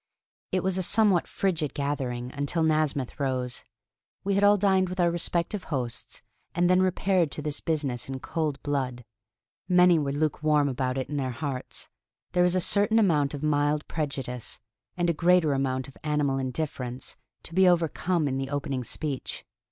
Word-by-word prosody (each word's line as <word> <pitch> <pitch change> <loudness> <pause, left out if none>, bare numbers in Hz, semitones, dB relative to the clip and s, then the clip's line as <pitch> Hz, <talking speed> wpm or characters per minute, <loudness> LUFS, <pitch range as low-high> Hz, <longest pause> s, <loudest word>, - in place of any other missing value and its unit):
It 185 - 0
was 190 0 0
a - - +1
somewhat 200 -1 +3
frigid 165 -7 -1
gathering 130 -4 -2
until 145 +4 0
Nasmyth 155 -4 0
rose. 130 -3 -1 0.6
We 200 - 0
had 200 +1 +2
all 205 0 +6
dined 190 -2 +3
with 185 +1 -6
our 170 -1 +4
respective 175 +3 -1
hosts, 125 -5 -4 0.3
and 175 +1 +3
then 185 +1 +4
repaired 185 -2 +2
to - - -4
this 150 0 -2
business 140 -6 -1
in 135 -1 -4
cold 155 -1 -2
blood. 130 -4 -2 0.6
Many 180 -2 +6
were 140 -2 -1
lukewarm 150 0 +1
about 130 -1 -1
it 130 - -2
in 145 - -4
their 130 -2 -1
hearts; 130 0 -4 0.4
there 180 - +2
was 180 0 +3
a - - +3
certain 205 +4 +2
amount 150 -9 +3
of 145 - -7
mild 150 0 +1
prejudice, 135 -6 -4 0.4
and 175 -1 +1
a 170 - +3
greater 170 -2 +3
amount 130 -1 -1
of 140 - -14
animal 145 -3 +1
indifference, 130 -2 -4 0.3
to 165 - -5
be 190 +1 +5
overcome 170 -1 +1
in 135 -1 -1
the 135 0 -3
opening 140 -3 -2
speech. 140 +2 -4
150 Hz, 170 wpm, -27 LUFS, 135-175 Hz, 0.6 s, all